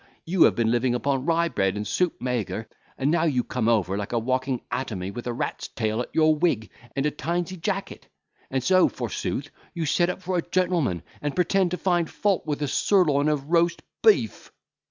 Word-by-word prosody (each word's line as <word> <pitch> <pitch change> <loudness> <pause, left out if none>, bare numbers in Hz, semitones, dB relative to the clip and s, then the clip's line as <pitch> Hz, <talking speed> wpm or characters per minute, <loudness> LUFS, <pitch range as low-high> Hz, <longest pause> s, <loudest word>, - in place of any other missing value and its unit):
You 175 +1 +5
have - - +3
been 115 -1 +1
living 120 +1 +1
upon 135 +1 -1
rye 170 0 +3
bread 95 -7 0
and 105 - -3
soup 180 +7 0
maigre, 120 -3 -2 0.3
and 140 +2 +1
now 165 0 +2
you 130 -6 +1
come 120 -3 -2
over 100 -5 +2
like 100 +3 -4
a - - +2
walking 130 +2 -1
atomy 100 -7 -3
with 120 +3 -7
a - - 0
rat's 120 - -3
tail 110 0 -2
at - - -6
your 155 -1 +4
wig, 150 -10 0 0.2
and 135 +1 0
a 150 - +2
tinsey 175 +4 -2
jacket. 165 - -4 0.4
And 130 -1 -1
so, 185 +4 +5
forsooth, - - -4 0.2
you 165 -2 -1
set 175 +3 +2
up 180 - -3
for 180 0 -1
a - - +2
gentleman, 175 - +1 0.2
and 145 -1 -2
pretend 185 +1 +2
to 180 - -3
find 175 -3 +1
fault 200 -3 0
with 150 0 -1
a - - 0
sirloin 150 -2 +3
of 150 0 -2
roast 170 0 +2 0.2
beef." 435 -2 +2
145 Hz, 200 wpm, -25 LUFS, 120-175 Hz, 0.4 s, You